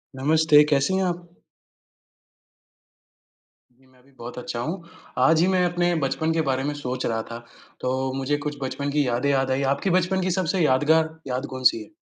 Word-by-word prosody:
नमस्ते, 150 +2 +4
कैसी 140 +5 +2
हैं 190 - +1
आप? 175 -1 -3 2.4
जी, 130 +2 -29
मैं 130 -1 -25
भी 140 - -25
बहुत 120 +1 -9
अच्छा 120 -1 -5
हूँ। 165 +10 -4 0.5
आज 160 0 +4
ही 175 - +3
मैं 185 -1 +2
अपने 175 0 +1
बचपन 135 +4 -1
के 165 - +1
बारे 130 0 0
में 145 +1 -2
सोच 130 -3 -4
रहा 115 -1 -1
था, 115 - -5 0.4
तो 130 +1 -1
मुझे 135 +2 0
कुछ 145 -1 -3
बचपन 140 +2 -3
की 145 -2 +1
यादें 125 +3 0
याद 135 -1 +1
आई, 130 +1 0
आपकी 140 +7 -2
बचपन 185 +1 +1
की 185 0 0
सबसे 185 +1 -1
यादगार 160 +4 +2
याद 130 +2 -2
कौन-सी 125 -3 +3
है? - - -18
145 Hz, 185 wpm, -24 LUFS, 130-165 Hz, 2.4 s, नमस्ते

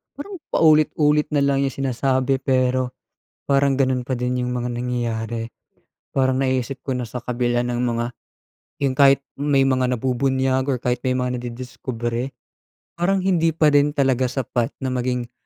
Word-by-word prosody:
parang 370 +7 -8
paulit-ulit 150 -1 +3
na 145 -1 +3
lang 140 -1 +2
yung 135 - -2
sinasabi, 130 0 0
pero 130 -1 +1 0.5
parang 140 -1 +2
ganun 130 -2 +1
pa 130 0 -2
din 125 +1 -1
yung 125 - -2
mga 125 0 -2
nangyayari. 120 -2 -3 0.6
Parang 130 -1 +2
naiisip 130 0 -1
ko 135 - -3
na 125 -2 -4
sa 120 +2 -7
kabila 120 0 0
ng 120 0 -2
mga 120 -1 0 0.8
yung 135 -2 0
kahit 140 0 +6 0.2
may 140 -1 +2
mga 130 -1 +2
nabubunyag 130 +1 +1
or 125 - -2
kahit 125 0 0
may 130 - +2
mga 125 0 -1
nadidiskubre, 120 0 -4 0.7
parang 190 +2 +1
hindi 165 -4 +2
pa 155 -2 +4
rin 145 +1 +3
talaga 130 -2 +2
sapat 125 -2 -1
na 130 - -1
maging, 125 -1 -2
130 Hz, 155 wpm, -22 LUFS, 125-140 Hz, 0.8 s, kahit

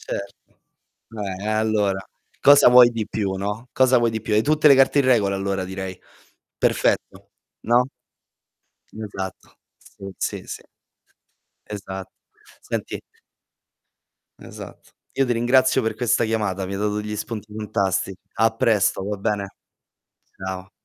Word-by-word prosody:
Certo. 100 0 -7 0.6
Eh, 100 -3 -5
e - - -2
allora, 110 -3 +1 0.4
cosa 145 -2 +8
vuoi 125 0 +8
di 110 -3 -3
più, 100 -3 -2
no, 105 +5 -4
cosa 130 0 +4
vuoi 120 -1 +2
di 110 0 -4
più? 110 - -2
Hai 105 +1 +3
tutte 155 +2 +4
le 140 - +8
carte 135 +2 +4
in 140 - +2
regola 105 -6 +3
allora, 95 -1 -2
direi. 95 0 -6 0.6
Perfetto, - - 0 0.3
no? 120 +2 +3 1.1
Esatto. 100 -3 -7 0.3
Sì, 95 -1 -10
sì, - - -3
sì. - - -8 1.0
Esat 95 -2 -6 0.5
senti - - -4 1.4
Esatto. - - -11 0.2
Io 135 - +2
ti 125 - -1
ringrazio 130 +3 +3
per 110 -1 -2
questa 120 -1 +1
chiamata, 105 -4 -1
mi 95 - -5
hai - - -3
dato 105 0 0
degli 105 0 -4
spunti 105 -1 -6
fantasti 95 -3 -1 0.2
a 115 0 +2
presto, 110 -4 +2
va 105 - -2
bene? 100 0 -1 0.9
Ciao. 95 0 -6
105 Hz, 135 wpm, -22 LUFS, 95-120 Hz, 1.4 s, cosa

